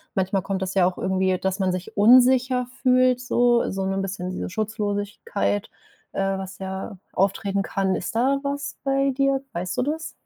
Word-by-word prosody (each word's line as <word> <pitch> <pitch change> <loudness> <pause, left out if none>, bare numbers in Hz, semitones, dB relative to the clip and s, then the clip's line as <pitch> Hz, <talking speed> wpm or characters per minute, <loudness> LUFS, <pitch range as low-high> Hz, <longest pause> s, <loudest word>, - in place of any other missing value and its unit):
manchmal 190 0 +1
kommt 195 -1 -3
das 185 - -3
ja 185 -2 +5
auch 185 - -3
irgendwie, 190 0 +1
dass 190 +1 -2
man 190 -1 +1
sich 180 0 -5
unsicher 250 +3 +5 0.2
fühlt, 255 -1 +4
so 240 -1 +2
so 190 0 -2
'nen 195 0 -1
bisschen 185 -1 -4
diese - - -4
Schutzlosigkeit, 205 - -2 0.4
äh, 195 0 0
was 190 0 -7
ja 190 +1 -5 0.2
auftreten 195 +1 0
kann. 195 -1 0
Ist 190 - -4
da 270 +4 +2
was 280 0 -3
bei 275 0 +2
dir? 275 0 +1
Weißt 180 +2 -3
du - - +2
das? 315 +3 -3
200 Hz, 175 wpm, -24 LUFS, 190-255 Hz, 0.4 s, ja